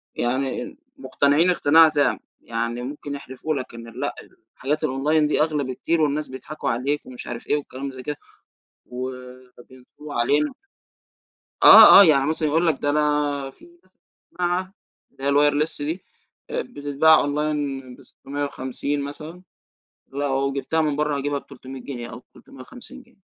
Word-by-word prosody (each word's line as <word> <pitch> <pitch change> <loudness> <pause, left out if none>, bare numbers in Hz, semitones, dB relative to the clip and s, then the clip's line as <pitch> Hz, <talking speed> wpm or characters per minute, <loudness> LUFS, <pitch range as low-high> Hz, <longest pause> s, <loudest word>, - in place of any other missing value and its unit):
يعني 135 - -2 0.2
مقتنعين 155 - +2
اقتناع 160 -2 +5
تام، 145 -2 +1 0.2
يعني 115 +1 -3
ممكن 145 +2 -6
يحلفوا 140 +3 -5
لَك 130 -3 -6
إن 115 0 -10
لأ - - -2 0.4
الحاجات 150 +4 -1
الonline 150 +4 +1
دي 150 - +1
أغلى 150 -2 0
بكتير 135 +6 -1
والناس 150 0 0
بيضحكوا 130 +4 -6
عليك، 135 +5 -2
ومش 125 -1 -10
عارف 120 -1 -7
إيه - - +2
والكلام 140 -1 -6
زي 130 -1 -10
كده، 150 - -4 0.7
و 125 +1 -5 0.5
وبينصبوا 130 +4 -13
علينا. 145 +5 +1 1.1
آه، - - +11
آه - - +9
يعني 145 -6 +4
مثلًا 155 0 0
يقول 165 +3 +1
لك 155 -4 +1
ده 145 - 0
أنا 145 -2 0
في 335 - -19
مثلًا 345 +1 -23 0.5
سماعة 180 +1 -1 0.4
اللي 135 - -15
هي 140 - +1
الwireless 145 +2 +2
دي 160 +6 -4 0.5
آآ - - -2
بتتباع 150 - +3
online 145 -3 -3
ب650 140 0 -5
مثلًا، 155 +5 -8 0.7
لو 140 0 -1
جبتها 140 +4 -1
من 150 -2 0
برّه 150 -1 0
هاجيبها 145 +1 -2
ب300 135 -1 -11
جنيه 120 -2 -7
أو 120 +2 -10
350 255 - -13
جنيه، 200 - -28
145 Hz, 145 wpm, -23 LUFS, 135-155 Hz, 1.1 s, آه